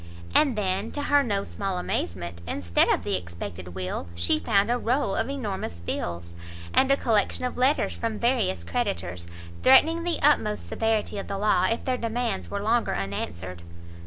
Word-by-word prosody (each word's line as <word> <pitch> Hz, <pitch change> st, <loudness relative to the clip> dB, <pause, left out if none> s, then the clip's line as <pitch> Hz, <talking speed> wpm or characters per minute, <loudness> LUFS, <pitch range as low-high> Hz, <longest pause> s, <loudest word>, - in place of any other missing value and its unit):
And 280 Hz, -6 st, +4 dB
then, 195 Hz, +1 st, -1 dB
to 290 Hz, -, -2 dB
her 285 Hz, 0 st, +4 dB
no 205 Hz, -7 st, 0 dB
small 195 Hz, -2 st, -3 dB
amazement, 85 Hz, -, -3 dB
instead 85 Hz, 0 st, +2 dB
of -, -, +2 dB
the -, -, 0 dB
expected 90 Hz, 0 st, -7 dB
will, 90 Hz, -1 st, -3 dB
she 85 Hz, -, +2 dB
found 205 Hz, +2 st, +2 dB
a 245 Hz, -, +2 dB
roll 240 Hz, -4 st, +1 dB
of 230 Hz, -, 0 dB
enormous 205 Hz, -, -4 dB
bills, 85 Hz, 0 st, -4 dB, 0.4 s
and 270 Hz, -, +4 dB
a 275 Hz, -, +5 dB
collection 220 Hz, +1 st, +1 dB
of 250 Hz, -, -3 dB
letters 260 Hz, +4 st, +2 dB
from 225 Hz, -2 st, -3 dB
various 235 Hz, -, +1 dB
creditors, 85 Hz, +1 st, -3 dB, 0.3 s
threatening 320 Hz, +6 st, +6 dB
the 345 Hz, -1 st, -1 dB
utmost 215 Hz, -8 st, +3 dB
severity 225 Hz, -2 st, 0 dB
of -, -, -6 dB
the 195 Hz, -, -3 dB
law 210 Hz, +2 st, +3 dB
if 230 Hz, -, -2 dB
their 255 Hz, -1 st, 0 dB
demands 230 Hz, -3 st, -2 dB
were 200 Hz, 0 st, -3 dB
longer 230 Hz, +2 st, +1 dB
unanswered. 90 Hz, -2 st, -4 dB
200 Hz, 170 wpm, -26 LUFS, -, 0.4 s, threatening